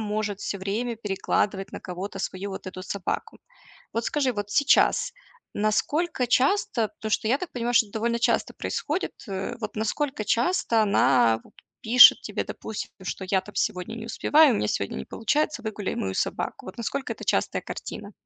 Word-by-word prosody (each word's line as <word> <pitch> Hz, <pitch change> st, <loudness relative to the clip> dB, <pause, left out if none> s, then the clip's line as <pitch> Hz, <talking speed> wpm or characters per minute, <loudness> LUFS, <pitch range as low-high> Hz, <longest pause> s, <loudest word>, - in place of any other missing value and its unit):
может 210 Hz, -1 st, -2 dB
всё 200 Hz, -, -3 dB
время 220 Hz, +5 st, -2 dB
перекладывать 195 Hz, -1 st, -1 dB
на -, -, -6 dB
кого-то 190 Hz, +2 st, -6 dB
свою 190 Hz, +1 st, -4 dB
вот 190 Hz, -, -7 dB
эту 185 Hz, 0 st, -7 dB
собаку. 190 Hz, -1 st, -4 dB, 0.5 s
Вот 230 Hz, 0 st, -1 dB
скажи, 275 Hz, -2 st, +1 dB
вот 205 Hz, -2 st, -4 dB
сейчас 305 Hz, -, +3 dB, 0.4 s
насколько 250 Hz, +7 st, 0 dB
часто, 250 Hz, -, +2 dB
потому 215 Hz, +1 st, -7 dB
что 215 Hz, -, +1 dB
я 255 Hz, -, +4 dB
так 365 Hz, -, -6 dB
понимаю, 240 Hz, 0 st, -2 dB
что 230 Hz, -1 st, +5 dB
это 200 Hz, -, -20 dB
довольно 235 Hz, +1 st, 0 dB
часто 235 Hz, -, +1 dB
происходит. 320 Hz, +6 st, -2 dB, 0.2 s
Э, 195 Hz, +4 st, -3 dB
вот 215 Hz, -2 st, -5 dB
насколько 225 Hz, +3 st, -1 dB
часто 235 Hz, -, +2 dB
она 125 Hz, -, +4 dB
вот -, -, -19 dB, 0.3 s
пишет 245 Hz, +3 st, +9 dB
тебе, -, -, -3 dB
допустим, 220 Hz, -, -6 dB
что: 190 Hz, +1 st, -4 dB
"Я 190 Hz, 0 st, +3 dB
там 210 Hz, -, -13 dB
сегодня 195 Hz, +1 st, -1 dB
не 230 Hz, 0 st, -7 dB
успеваю, 290 Hz, +3 st, +4 dB
у -, -, +1 dB
меня -, -, 0 dB
сегодня 100 Hz, -5 st, -2 dB
не 65 Hz, -, -5 dB
получается, 290 Hz, -, -1 dB
выгуляй 215 Hz, -3 st, -3 dB
мою 95 Hz, -1 st, -2 dB
собаку". -, -, -2 dB
Вот -, -, -9 dB
насколько 265 Hz, +4 st, -3 dB
это -, -, -9 dB
частая -, -, +1 dB
картина? -, -, -7 dB
220 Hz, 175 wpm, -26 LUFS, 195-245 Hz, 0.5 s, пишет